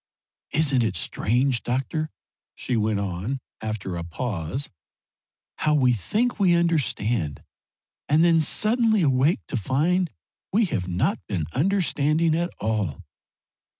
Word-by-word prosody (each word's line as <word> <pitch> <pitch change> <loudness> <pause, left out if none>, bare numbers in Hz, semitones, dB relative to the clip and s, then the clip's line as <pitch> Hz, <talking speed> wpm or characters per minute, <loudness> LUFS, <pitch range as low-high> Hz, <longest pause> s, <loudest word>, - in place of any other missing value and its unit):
"Isn't 140 -4 +2
it 105 -4 -1
strange, 125 +3 +1
doctor," 135 +5 -2 0.5
she 125 - -2
went 110 -2 +1
on, 100 +7 -3 0.2
after 110 -4 -4
a 85 - -4
pause, 95 - -3 0.9
"how 150 0 +2
we 130 -4 +4
think 215 - -1
we 180 -3 +4
understand, 120 - 0 0.7
and 155 +3 +5
then 165 -2 +5
suddenly 220 - +2
awake 135 - +2
to - - -2
find 160 - +1 0.4
we 220 +3 +3
have 90 - -2
not 90 0 0
been 80 - -2
understanding 160 -1 +2
at 170 +2 0
all? 105 -8 -2
135 Hz, 120 wpm, -24 LUFS, 105-170 Hz, 0.9 s, and